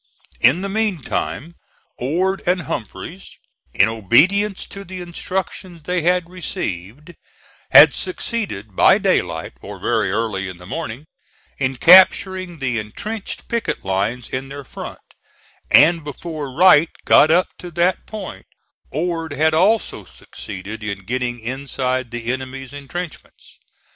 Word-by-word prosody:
In 135 +10 +4
the 195 - -2
meantime 190 - -2 0.5
Ord 180 +9 0
and 180 0 +2
Humphreys, 165 - -7 0.4
in 100 - +5
obedience 165 - +3
to 200 - -9
the 185 0 -8
instructions 180 -1 -5
they 180 +2 -1
had 180 +1 +1
received, 150 - -6 0.6
had - - +9
succeeded 200 - -3
by - - +6
daylight, - - 0
or - - -8
very 110 -5 0
early 100 -3 -2
in 90 - -9
the 90 - -13
morning, 135 - -6 0.5
in 135 -1 0
capturing 185 +2 +5
the 125 -5 -1
intrenched 200 - -6
picket 235 - -2
lines 100 +6 -1
in 130 +1 -5
their 140 +1 -8
front; - - -8 0.7
and 165 +2 +6
before 150 -1 -6
Wright 165 +1 +6 0.2
got 155 - +6
up 175 +3 +3
to 180 - -8
that 175 +2 0
point, 210 -4 -8 0.4
Ord 165 0 -2
had 155 +3 +2
also 200 +8 +2
succeeded 105 +3 -9
in 100 -2 -5
getting 125 +1 -2
inside 130 +1 -2
of - - -28
the 120 +1 -2
enemy's 130 0 -7
intrenchments. 145 +4 -8
150 Hz, 130 wpm, -20 LUFS, 120-180 Hz, 0.7 s, had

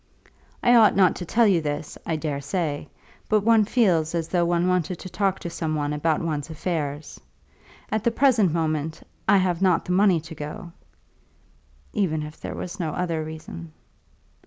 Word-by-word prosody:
I 245 - +5
ought 225 -3 +6
not 185 -3 +4
to 175 - -5
tell 235 +5 +3
you 190 -5 +3
this, 145 0 -4
I 165 - 0
dare 150 -2 -3
say, 150 0 -2 0.4
but 215 -1 +3
one 225 0 +4
feels 175 -9 +2
as 165 -1 -2
though 175 -2 +2
one 175 +1 +1
wanted 180 -1 0
to 185 - -9
talk 190 +1 0
to 175 - -4
some 160 -2 -2
one 145 -1 -1
about 155 +1 0
one's 155 -1 -3
affairs. 155 -3 -4 0.7
At 215 -1 0
the - - +3
present 230 - +3
moment, 155 -1 -2 0.3
I 200 - +7
have 185 -2 +1
not 185 -3 +3
the - - -3
money 185 -2 +4
to 160 +1 -10
go, 150 +3 -7 1.2
even 160 -7 0
if 150 +1 -10
there - - -5
were - - -4
no 160 -4 -2
other 170 -3 -2
reason." 155 - -9
170 Hz, 180 wpm, -24 LUFS, 155-190 Hz, 1.2 s, I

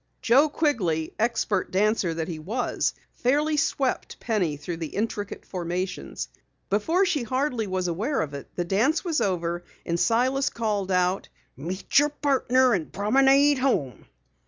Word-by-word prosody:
Joe 265 +6 +5
Quigley, 185 - 0
expert 220 -4 0
dancer 200 -2 +1
that 160 -1 -3
he 165 -3 -5
was, 220 +11 -1 0.2
fairly 295 +5 +2
swept 275 -2 -1
Penny 185 -10 0
through 165 +4 -5
the 165 -2 -6
intricate 205 -1 -3
formations. 180 +1 -4 0.4
Before 325 - +2
she 340 -6 0
hardly 250 -1 -1
was 185 -1 -1
aware 215 - -1
of 150 -2 -4
it, 140 - -8
the 175 - -1
dance 240 - +1
was 330 -3 0
over 175 -2 -1 0.2
and 170 0 -1
Silas 260 +6 +2
called 210 -4 -2
out: 180 0 +1 0.3
"Meet 180 - +1
your 295 +1 +3
partner 260 -3 +2
and 170 -6 -2
promenade 270 +7 +4
home." 185 - -1
215 Hz, 145 wpm, -25 LUFS, 180-270 Hz, 0.4 s, Joe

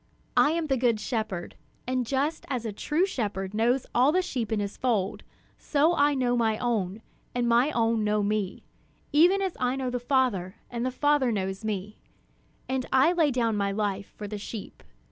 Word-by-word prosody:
"I 295 - +5
am 335 -1 -1
the 270 -3 +1
good 235 -3 +2
shepherd; 215 -6 -3 0.3
and 255 -1 -1
just 280 +5 -1
as 250 -4 -2
a 220 - -3
true 310 - +1
shepherd 205 - -3
knows 240 +4 +2
all 255 +4 +4
the 365 +3 +2
sheep 245 - -3
in 220 - +1
his 200 0 -3
fold, 215 -6 0 0.4
so 305 +3 +2
I 290 -3 +3
know 245 -2 +1
my 225 -2 +1
own, 215 -4 -1 0.3
and 245 -1 +1
my 240 +4 +4
own 230 -4 +1
know 210 0 +1
me, 205 -2 -1 0.5
even 360 +6 +5
as 380 -3 -2
I 250 0 +1
know 260 -2 -2
the 245 - -1
Father, 240 -8 0 0.2
and 235 -1 -3
the 255 - +1
Father 285 -1 +2
knows 190 -1 -3
me; 210 -1 -4 0.7
and 260 -1 -2
I 265 +6 +5
lay 330 -4 +3
down 235 -4 +1
my 200 -1 0
life 200 -1 -2
for 210 - -5
the 210 0 -5
sheep. 210 0 -8
240 Hz, 190 wpm, -27 LUFS, 210-270 Hz, 0.7 s, I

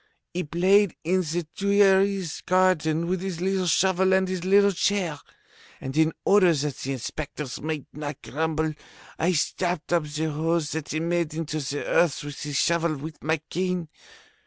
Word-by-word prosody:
He 180 +1 -1
played 185 +5 +3
in 185 +3 +2
the 170 0 -2
Tuileries 195 -3 +2
garden 170 -3 +2
with 180 +1 -1
his 190 -3 -4
little 190 0 0
shovel 190 +2 +3
and 190 0 +2
his 185 -2 -3
little 200 +2 +5
chair, 180 -5 0 0.6
and 135 +1 -6
in 160 0 +4
order 195 -3 +5
that 145 -1 -2
the 135 - -3
inspectors 140 +1 -5
might 155 -3 -3
not 145 -1 -6
grumble, 160 +1 -1 0.5
I 175 +3 +2
stopped 175 +1 -1
up 170 -3 +2
the 155 +1 -2
holes 160 +1 0
that 160 -1 -4
he 155 - -1
made 170 -1 -1
in 165 0 -2
the 145 -2 -3
earth 165 -6 +2
with 145 -1 -7
his 145 -2 -3
shovel, 170 0 +2
with 155 +2 -8
my 160 0 0
cane. 180 -2 -1
165 Hz, 165 wpm, -25 LUFS, 155-185 Hz, 0.6 s, little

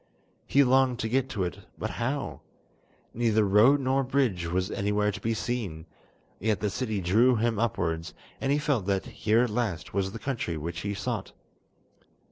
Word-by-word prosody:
He 140 - +5
longed 130 -1 +3
to 110 - -1
get 130 +3 0
to 105 -8 -2
it, 90 -4 -4 0.2
but - - -3
how? 130 +4 -3 0.7
neither 110 -2 +2
road 110 +9 +6
nor 135 +1 +2
bridge 125 -10 0
was 90 +3 -1
anywhere 105 +1 +1
to - - -8
be 115 0 0
seen, 100 -10 -3 0.5
yet 105 0 0
the 105 -2 -1
city 110 -4 -2
drew 115 +8 +4
him 115 -1 0
upwards, 80 -8 -1 0.3
and 135 - 0
he 145 - +3
felt 140 -9 0
that 100 -1 0
here 110 +3 +2
at 120 - -1
last 105 -8 -2
was 95 0 0
the 115 - -6
country 115 - -3
which 85 +2 -4
he 100 +3 -3
sought. 110 -1 -4
110 Hz, 175 wpm, -28 LUFS, 95-125 Hz, 0.7 s, road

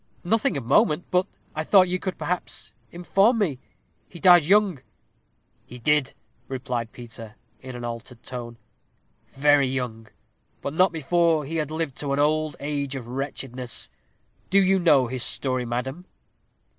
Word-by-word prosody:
"Nothing 210 -3 +1
of 130 - -5
moment. 150 +7 +3
But 180 +1 +2 0.3
I 155 - -2
thought 185 +2 +5
you 180 +1 -1
could, 185 0 -4
perhaps, 180 0 -3 0.2
inform 195 +7 +2
me. 165 - 0 0.5
He 170 - -11
died 175 -1 +7
young." 190 -2 +3 0.8
"He 125 - -11
did," 140 +2 +1 0.3
replied 125 -3 -4
Peter, 115 -2 -10 0.2
in 130 -1 -9
an 120 -1 -6
altered 115 0 -7
tone 120 -2 -7 0.7
"very 145 0 +3
young; 125 -4 -4 0.5
but 140 - -4
not 185 +3 +4
before 165 0 +1
he 165 +4 -3
had 150 -2 -1
lived 155 -4 -3
to 140 -2 -2
an 140 - 0
old 155 0 +1
age 140 -1 -3
of 130 -3 -6
wretchedness. 130 -1 -4 0.6
Do 195 - +5
you 190 0 +3
know 150 -7 +5
his 125 +1 -4
story, 130 -1 0
madam?" 130 +8 -4
145 Hz, 150 wpm, -25 LUFS, 125-175 Hz, 0.8 s, died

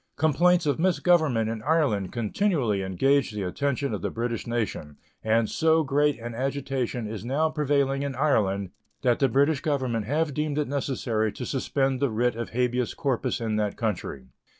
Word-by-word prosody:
Complaints 170 +4 +3
of 145 +1 0
misgovernment 160 -9 +2
in 110 -1 -3
Ireland 130 - +1
continually 120 - 0
engage 135 +9 +2
the 105 -2 -4
attention 140 +8 -1
of - - -3
the - - -1
British 120 0 -3
nation, 105 -11 -3 0.3
and 110 0 +2
so 160 +4 +2
great 145 +1 +2
an 120 0 -7
agitation 130 -2 -2
is 110 0 -6
now 145 +6 +1
prevailing 140 -2 +1
in 140 -2 -3
Ireland 100 -9 +1 0.3
that 120 -2 +2
the 135 - +3
British 140 +3 +2
Government 130 -8 -1
have 150 +2 0
deemed 150 0 -2
it 150 - 0
necessary 125 -5 -1
to 125 - -6
suspend 135 0 0
the 140 0 +1
writ 120 +2 0
of 115 0 -4
habeas 125 0 -1
corpus 130 -3 -1
in 110 -2 -1
that 105 -2 -1
country. 90 - -3
130 Hz, 170 wpm, -26 LUFS, 110-145 Hz, 0.3 s, Complaints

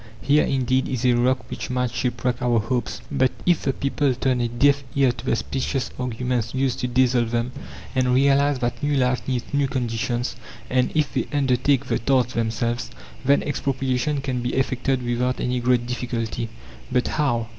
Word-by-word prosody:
Here, 145 +2 +3
indeed, 130 -1 +1
is 130 -1 -2
a 125 - +5
rock 125 +1 +1
which - - -5
might 125 -1 0
shipwreck 125 0 -1
our 120 -2 +2
hopes. 120 +1 -2
But 130 -3 +2
if 175 -3 +3
the 135 - +1
people 140 0 0
turn 125 0 +1
a 120 - +1
deaf 140 +4 +3
ear 135 -3 +4
to 120 0 -10
the 130 - +2
specious 135 +2 -2
arguments 125 -1 -2
used 130 -1 0
to 125 - -1
dazzle 125 -1 +3
them, 120 +2 -1 0.4
and 130 -1 +2
realize 140 +1 +4
that 120 -1 -2
new 145 0 +1
life 125 -1 +2
needs 125 -1 -3
new 140 -1 +2
conditions, 120 -1 -2 0.4
and 130 -1 +2
if 155 -2 +1
they - - -1
undertake 135 -1 +2
the - - 0
task 125 0 +2
themselves, 115 0 -1 0.3
then 140 +2 +3
expropriation 135 0 -1
can 130 -2 -2
be 120 - -2
effected 130 0 0
without 125 +1 0
any 125 0 0
great 120 0 +2
difficulty. 120 -2 -3 0.4
"But 125 -1 +2
how? 120 -7 0
125 Hz, 175 wpm, -23 LUFS, 120-135 Hz, 0.4 s, a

